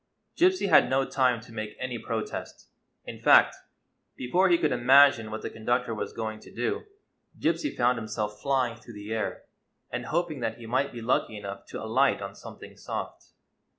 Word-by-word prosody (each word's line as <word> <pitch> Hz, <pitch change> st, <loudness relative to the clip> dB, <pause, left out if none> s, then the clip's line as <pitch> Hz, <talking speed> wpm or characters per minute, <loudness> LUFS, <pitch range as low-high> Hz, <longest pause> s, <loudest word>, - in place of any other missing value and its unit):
Gypsy 365 Hz, -, +3 dB
had 160 Hz, -, +6 dB
no 135 Hz, 0 st, +2 dB
time 125 Hz, -4 st, +1 dB
to 115 Hz, -, -15 dB
make 110 Hz, -1 st, -6 dB
any 125 Hz, -2 st, -4 dB
protest. 110 Hz, -2 st, -5 dB, 0.4 s
In -, -, -8 dB
fact, -, -, +6 dB, 0.6 s
before 180 Hz, +10 st, +2 dB
he 170 Hz, -, +5 dB
could 155 Hz, -3 st, +1 dB
imagine 125 Hz, -1 st, +5 dB
what 110 Hz, 0 st, -6 dB
the -, -, -3 dB
conductor 120 Hz, +1 st, -1 dB
was 110 Hz, -, -4 dB
going 110 Hz, -1 st, -5 dB
to -, -, -15 dB
do, 425 Hz, +2 st, -2 dB, 0.5 s
Gypsy 295 Hz, -, -1 dB
found 120 Hz, 0 st, +2 dB
himself 105 Hz, -1 st, -4 dB
flying 130 Hz, -4 st, +1 dB
through 115 Hz, -1 st, -13 dB
the 105 Hz, +2 st, -6 dB
air 110 Hz, -1 st, -3 dB, 0.5 s
and -, -, -4 dB
hoping 170 Hz, -5 st, -1 dB
that -, -, -3 dB
he 120 Hz, -, -11 dB
might 130 Hz, +5 st, 0 dB
be 120 Hz, -2 st, -8 dB
lucky 115 Hz, -2 st, 0 dB
enough 100 Hz, -1 st, -8 dB
to -, -, -7 dB
alight 130 Hz, +5 st, +2 dB
on 100 Hz, 0 st, -6 dB
something -, -, -12 dB
soft. -, -, -6 dB
120 Hz, 180 wpm, -27 LUFS, 110-140 Hz, 0.6 s, had